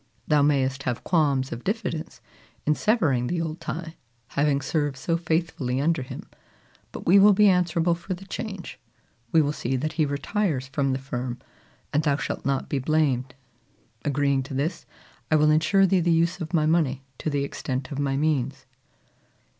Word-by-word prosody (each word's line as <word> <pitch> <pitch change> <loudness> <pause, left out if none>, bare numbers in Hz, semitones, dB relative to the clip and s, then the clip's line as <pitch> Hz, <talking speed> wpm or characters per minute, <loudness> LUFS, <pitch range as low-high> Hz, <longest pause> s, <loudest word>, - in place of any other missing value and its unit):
Thou 150 -1 +4
mayest 135 -2 +2
have 125 -3 -3
qualms 140 -6 +1
of 120 - -6
diffidence 190 -6 -3 0.4
in 150 - +4
severing 150 - +1
the 175 - -1
old 160 0 -4
tie, 165 0 -5 0.3
having 140 -1 +1
served 145 0 -1
so 165 +5 -1
faithfully 160 -6 -1
under 160 +1 +1
him; 130 - -8 0.6
but - - -8
we 190 +4 +7
will 205 +1 +7
be 210 +1 +5
answerable 175 -2 +3
for 175 +2 -4
the 190 +2 -12
change: 195 -3 -6 0.5
we 160 - +5
will 145 - 0
see 130 -2 -2
that 155 +4 -2
he 155 -3 +1
retires 145 0 -1
from 135 -1 0
the - - 0
firm, 125 -2 -4 0.6
and 150 - +3
thou 145 -2 +2
shalt - - -4
not 135 -1 0
be 140 - -1
blamed. 130 -3 0 0.7
Agreeing 140 -1 +1
to 135 +1 -7
this, 155 +6 -2 0.4
I 155 - +4
will 150 0 +5
insure 160 +6 +4
thee 190 0 +3
the 175 0 +1
use 170 +2 +2
of 160 -1 -5
my 155 -3 +2
money 155 -5 +1 0.2
to - - -2
the 145 -1 0
extent 130 0 -4
of 140 - -4
my 135 -1 0
means." 140 -3 0
150 Hz, 180 wpm, -25 LUFS, 135-170 Hz, 0.7 s, we